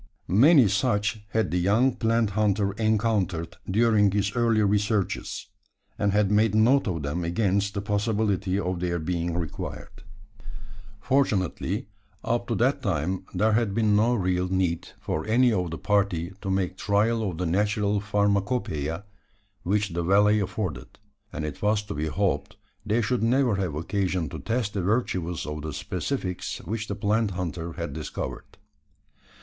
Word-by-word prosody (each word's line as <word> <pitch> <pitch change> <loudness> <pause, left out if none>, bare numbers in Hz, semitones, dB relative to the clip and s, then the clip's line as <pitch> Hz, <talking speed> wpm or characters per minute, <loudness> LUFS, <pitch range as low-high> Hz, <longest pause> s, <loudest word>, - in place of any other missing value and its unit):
Many 130 - +6
such 105 +1 0
had 110 -1 0
the 90 - +1
young 110 +8 +3
plant 115 -3 +1
hunter 100 -1 +1
encountered 100 -6 0
during 105 0 +4
his 100 +2 -1
early 115 -3 +3
researches; 105 0 0 0.5
and 100 -1 +2
had 105 0 +2
made 105 0 +3
note 120 +5 +4
of 85 -5 -2
them 75 +5 -2
against 100 +3 0
the 100 - -2
possibility 105 -2 0
of 90 -2 -2
their 85 -1 -1
being 85 +1 -2
required. 85 +3 -6 1.0
Fortunately, 105 - 0 0.4
up 120 - -1
to 115 - -1
that 125 +7 +1
time 90 -1 -1
there 110 +1 +3
had 110 -2 +1
been 110 -2 +3
no 115 +4 +3
real 90 -3 0
need 90 -3 0
for 80 - -3
any 120 +2 +4
of 90 -4 -1
the 80 - -5
party 95 -4 0
to 95 - -4
make 95 -1 -1
trial 110 +3 +1
of 85 - -6
the 90 - -2
natural 105 +3 +1
Pharmacopoeia 100 - -1 0.6
which 105 +2 0
the 85 0 -2
valley 105 +4 +4
afforded: 95 - -4 0.3
and 80 -2 -4
it 75 - -6
was 105 0 +2
to 105 - -6
be 75 +1 -2
hoped 95 +5 -1 0.3
they 110 +3 +1
should 120 +3 0
never 120 -2 +2
have 90 -6 -2
occasion 90 0 -1
to - - -7
test 115 -2 -2
the 100 - -1
virtues 90 -5 -1
of 75 0 -5
the 80 +1 -5
specifics 90 - -3
which 110 0 -3
the 100 - -3
plant 105 +1 +1
hunter 85 -2 -4
had - - -5
discovered. - - -6
100 Hz, 155 wpm, -26 LUFS, 90-110 Hz, 1.0 s, Many